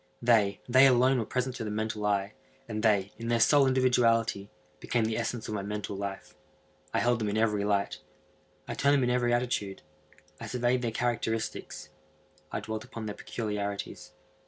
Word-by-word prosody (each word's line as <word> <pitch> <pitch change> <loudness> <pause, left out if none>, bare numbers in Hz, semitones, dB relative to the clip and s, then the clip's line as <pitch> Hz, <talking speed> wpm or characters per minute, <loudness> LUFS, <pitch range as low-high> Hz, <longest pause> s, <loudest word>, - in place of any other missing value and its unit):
They—they 120 +3 +4
alone 130 0 +4
were 115 - -1
present 125 +1 -2
to 115 - -4
the 110 - -4
mental 110 0 -2
eye, 100 0 0 0.3
and 110 -2 -3
they, 100 -3 +2
in 115 - -5
their 120 0 +2
sole 140 +4 +5
individuality, 115 -5 +2 0.3
became 120 -2 0
the 110 0 -1
essence 115 0 -3
of - - -4
my 105 - -2
mental 105 0 -4
life. 100 0 -6 0.6
I - - -1
held 120 0 +2
them 105 -2 -1
in 105 - -1
every 105 -2 +1
light. 100 -1 0 0.7
I - - -3
turned 140 +1 +3
them 135 - +2
in 125 - +1
every 120 -1 +1
attitude. 120 -7 -1 0.6
I - - -6
surveyed 125 0 0
their 120 - -1
characteristics. 115 -1 -3 0.6
I - - -3
dwelt 110 0 -5
upon 115 -1 -8
their 105 - -4
peculiarities. 105 -3 -5
115 Hz, 175 wpm, -29 LUFS, 105-120 Hz, 0.7 s, sole